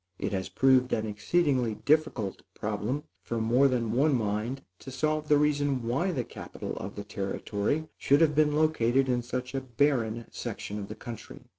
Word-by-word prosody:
It - - -2
has 95 -1 -2
proved 130 -1 +4
an 110 - 0
exceedingly 120 +2 +1
difficult 145 -7 +1
problem, 105 +7 -2 0.2
for 115 - -3
more 120 +5 +4
than 120 -4 0
one 140 +4 +3
mind, 115 +4 -1 0.2
to - - -9
solve 155 +3 -1
the 150 - +5
reason 145 -3 +1
why 165 +11 +1
the 130 -8 -1
capital - - -7
of 100 +2 -6
the 100 - -5
Territory 105 +8 -2
should 140 +3 +4
have 155 -2 +5
been 150 0 +3
located 135 -4 +3
in 125 -1 +1
such 125 +1 -4
a 135 - -1
barren 120 -3 0
section 105 +1 -5
of 100 - -5
the 110 - -7
country. 115 0 -9
125 Hz, 175 wpm, -29 LUFS, 110-145 Hz, 0.2 s, the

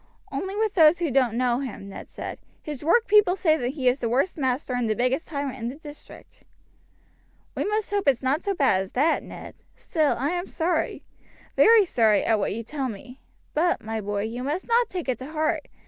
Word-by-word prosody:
"Only 385 +1 -4
with 430 -1 0
those 320 -1 +6
who 335 -4 -1
don't 250 -3 +2
know 250 -1 +1
him," 250 -7 -6
Ned 195 - -9
replied; - - -6 0.2
"his 295 -3 -6
workpeople 420 +1 +4
say 315 -9 +1
he 265 -2 -2
is 250 +2 +3
the 235 - -1
worst 270 +10 +1
master 260 -2 -1
and 245 -2 -1
the 215 - +1
biggest 255 +7 0
tyrant 280 -4 -4
in 230 +1 -3
the 255 - -7
district." 295 -1 -14 1.1
"We - - -1
must 425 0 -1
hope 405 -5 -1
it's 265 -2 +2
not 275 +5 0
so 400 -1 -1
bad 265 - +3
as 190 - -7
that, 300 +6 +2
Ned; - - -10 0.2
still, 310 -4 0
I 280 +5 -1
am 355 +1 -3
sorry 330 -1 -1 0.5
very 450 -3 +6
sorry, 220 - +2
at 225 -2 +2
what 195 - -1
you 230 - -5
tell 270 +2 -4
me; 250 +5 -10 0.3
but, 345 +3 +1
my 220 0 -3
boy, 205 0 -2
you 230 +3 -4
must 295 +8 -3
not 470 0 +2
take 360 -5 -5
it 255 - -1
to 270 +5 -8
heart. 310 0 -1
280 Hz, 210 wpm, -25 LUFS, 245-345 Hz, 1.1 s, those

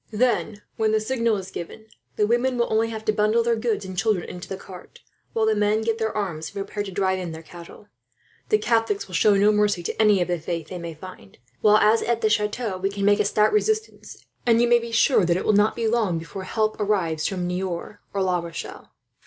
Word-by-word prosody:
Then, 220 -2 0
when 220 -1 +1
the 220 - +3
signal 230 -1 0
is 190 -1 -7
given, 190 +6 -8 0.3
the 210 - +2
women 245 +3 +1
will 235 -2 0
only 225 +1 +2
have 220 -1 -7
to 215 - +2
bundle 215 +2 +2
their 235 0 +2
goods 220 -3 -2
and 185 0 -7
children 195 -2 0
into 180 - -8
the 190 - -4
cart; 185 -2 -13 0.3
while 225 -1 +1
the 220 - +3
men 210 +1 +1
get 225 0 -1
their 220 -1 0
arms, 170 -6 -3
and - - -13
prepare 205 +1 -5
to 205 - -4
drive 190 0 0
in 175 -3 -5
their 160 +1 -9
cattle. 175 +5 -13 0.6
"The 430 - +4
Catholics 225 - 0
will 185 - -13
show 205 +4 +4
no 205 +2 +4
mercy 210 -4 +1
to 175 - -2
any 210 -2 +5
of 175 - 0
the 175 -1 -1
faith 165 0 -5
they 180 - -6
may 170 -1 -7
find; 155 - -12 0.2
while 210 0 +6
as 215 +2 +4
to 235 -1 0
the 215 -1 +1
chateau, 210 -2 -1
it 195 0 0
can 200 -1 -1
make 205 +1 +4
a 210 - +2
stout 210 - +2
resistance, 435 +1 -2 0.2
and 230 -1 +3
you 240 - +4
may 240 0 +5
be 235 0 -7
sure 230 -1 +4
that 170 0 +2
it - - -4
will 215 - +3
not 205 +1 +3
be 230 -1 -1
long 220 -7 +1
before 165 +4 -7
help 215 +2 -1
arrives, 180 -7 0
from 185 -2 -3
Niort 180 +2 -4
or 195 -1 -1
La 180 -1 +1
Rochelle." 170 -1 -8
210 Hz, 240 wpm, -24 LUFS, 185-220 Hz, 0.6 s, while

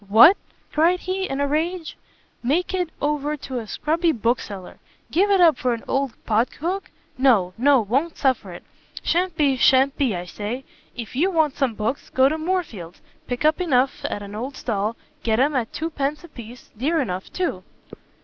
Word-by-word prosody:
"What," 235 - +9 0.4
cried 340 +4 +3
he, 380 +1 -2
in 270 - -2
a 285 - +1
rage, 325 +3 -2 0.5
"make 320 +10 0
it 360 -3 0
over 295 0 -1
to 260 -3 -5
a 225 - -8
scrubby 325 +7 +1
bookseller! 220 - -3 0.3
give 390 +5 +3
it 395 -1 +4
up 330 -6 +5
for 250 -2 +1
an 230 - -10
old 270 -3 0
pot 225 +2 +2
hook? 370 +5 -3 0.3
no, 215 -9 +4
no, 265 +2 +4
won't 270 +11 -1
suffer 255 -8 0
it; 175 - -10 0.4
sha'n't 355 0 0
be, 280 -3 +3
sha'n't 265 +2 +4
be, 255 -8 +1
I 175 0 -4
say! 215 +8 -5 0.3
if 235 -1 -7
you 335 +9 +2
want 315 -6 +1
some 265 -6 0
books, 225 +6 -3
go 260 0 +4
to 310 +3 -1
Moorfields, 310 - -3 0.3
pick 245 +4 -2
up 310 +4 +3
enough 270 -6 +1
at 205 - -3
an 200 0 -9
old 250 +6 -5
stall; 215 -2 -2 0.3
get 225 -3 +1
'em 285 +3 +2
at 235 -4 -1
two 325 +2 -3
pence 290 +2 -2
a 345 - -12
piece; 240 -2 -12
dear 300 +9 0
enough, 190 -8 -3
too." 365 -1 -2
270 Hz, 190 wpm, -23 LUFS, 230-320 Hz, 0.5 s, What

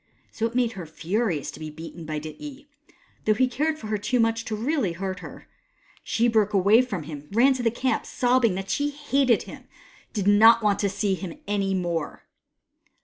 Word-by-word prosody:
So 225 - -1
it 230 - -10
made 245 -2 +2
her 185 -7 -8
furious 170 - -2
to - - -12
be 155 -1 -6
beaten 165 +2 -9
by 155 -1 -3
Dityi, 270 - -9 0.6
though 215 - +3
he 255 +4 +3
cared 305 +5 -1
for 230 - -10
her 215 -1 -2
too 240 +5 0
much 225 0 +1
really 225 - -1
to - - -14
hurt 190 -1 -3
her, - - -10
and - - -23 0.6
she 235 +1 +1
broke 215 -3 +2
away 200 +5 +5
from 200 -10 -4
him 150 -1 -8
and 200 - -11
ran 260 +4 +5
to 260 - -4
the 235 - +2
camp, 240 +1 -1
sobbing 245 -5 +2
that 195 +1 -4
she 290 0 0
hated 280 -4 +1
him - - -9
and - - -22 0.5
did 205 -4 -2
not 225 +3 +7
want 205 -1 +2
to 200 - +1
see 200 0 0
him 185 -2 -6
any 200 -1 0
more. 170 -4 -3
215 Hz, 210 wpm, -25 LUFS, 190-245 Hz, 0.6 s, not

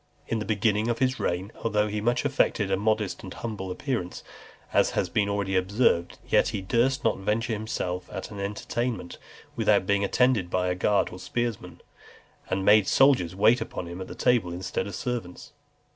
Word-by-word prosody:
In 115 - -1
the 105 - -4
beginning 105 0 +1
of 120 -1 0
his 130 +1 0
reign, 90 +4 -2
though 105 -1 +1
he 105 0 -3
much 120 +4 +1
affected 110 -7 +1
a - - +4
modest 105 0 0
and 95 - -9
humble 105 -4 -5
appearance, 100 -2 -3 0.5
as - - +4
has - - +1
been 100 -1 +1
already 100 -1 -1
observed, 95 -2 +1
yet - - +3
he - - -3
durst 120 +7 +1
not 110 - +1
venture 110 +4 -1
himself 100 -4 -3
at 95 - -6
an 100 - -7
entertainment 105 0 -3 0.4
without - - +3
being 100 +1 +2
attended 110 -3 +2
by 90 0 0
a - - +1
guard 100 +1 +1
of 90 - -9
spearmen, 120 -3 -3 0.7
and 95 0 -1
made 105 -2 +6
soldiers 125 -11 +4
wait 110 +5 +4
upon 110 - -5
him 85 +2 -7
at 95 - -8
table 120 -8 +2
instead 90 +3 -3
of 100 - -6
servants. 120 -8 -5
105 Hz, 180 wpm, -26 LUFS, 95-115 Hz, 0.7 s, made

